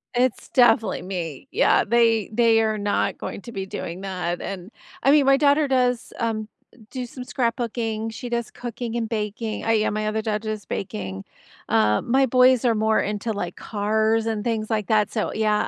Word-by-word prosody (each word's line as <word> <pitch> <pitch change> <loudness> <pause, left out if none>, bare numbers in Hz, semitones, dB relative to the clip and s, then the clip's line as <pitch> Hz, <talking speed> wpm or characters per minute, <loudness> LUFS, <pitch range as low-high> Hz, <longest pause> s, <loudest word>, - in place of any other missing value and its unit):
It's 250 -1 0
definitely 240 -3 +3
me. 175 - -5
Yeah, 460 - +3
they 230 -1 +2
they 225 0 +4
are 220 -1 0
not 205 0 0
going - - -6
to 235 - -9
be 195 -3 -4
doing 180 -1 -6
that, 180 -3 -3
and 195 +2 -6 0.3
I 275 - +5
mean, 290 -1 +5
my 275 0 +5
daughter 290 +1 +3
does, 250 -3 +1
um, 220 -2 -1 0.3
d - - -21
do 255 -2 -4
some 250 +1 -8
scrapbooking; 230 -3 -2
she 245 +2 -7
does 235 -1 -2
cooking 235 -1 -6
and 230 -1 -1
baking. 215 0 -3
Uh, - - -1
yeah, 215 -1 +2
my 215 +1 -2
other 215 +1 -1
daughter 215 0 -2
does 215 -2 -4
baking. 95 - -5 0.5
Uh, 105 -1 +3
my 265 +3 +3
boys 255 0 +4
are 235 -2 +3
more 220 0 +2
into, 210 +2 -2
like, 175 -4 -4
cars 220 +1 0
and 220 -2 -2
things 220 -2 -1
like 215 -3 -1
that. 215 -2 +2
So, 215 - -2
yeah, 215 -1 +1
220 Hz, 190 wpm, -23 LUFS, 210-240 Hz, 0.5 s, I